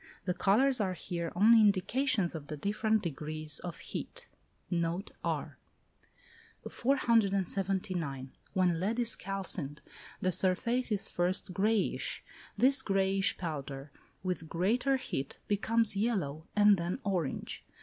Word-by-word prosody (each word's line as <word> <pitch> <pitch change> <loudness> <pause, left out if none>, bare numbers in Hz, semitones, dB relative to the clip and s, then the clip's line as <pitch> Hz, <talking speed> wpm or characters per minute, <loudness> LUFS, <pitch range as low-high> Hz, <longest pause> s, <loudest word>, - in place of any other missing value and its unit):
The 180 - 0
colours 245 +7 +3
are 185 -2 -1
here 170 -1 -4
only 220 +4 +6
indications 210 +1 +2
of 155 -3 -7
the 150 - -5
different 215 +5 0
degrees 155 -2 -2
of 175 -3 -6
heat. - - -6 0.5
Note 170 +3 -1
R. - - -3 1.1
479. 195 - 0 0.2
When 180 -3 +2
lead 210 +6 -1
is 235 -2 +2
calcined, 185 -7 -5 0.4
the 185 - +1
surface 230 +8 +1
is 205 -2 +1
first 180 +1 0
greyish. 210 +3 0 0.3
This 265 +2 +5
greyish 195 -3 +1
powder, 145 -4 -5 0.3
with 180 -4 -3
greater 240 +10 +1
heat, 135 - -4
becomes 220 +1 +3
yellow, 185 -9 -1
and 205 -1 +6
then 170 +4 -2
orange. 180 -8 -2
190 Hz, 120 wpm, -31 LUFS, 170-215 Hz, 1.1 s, only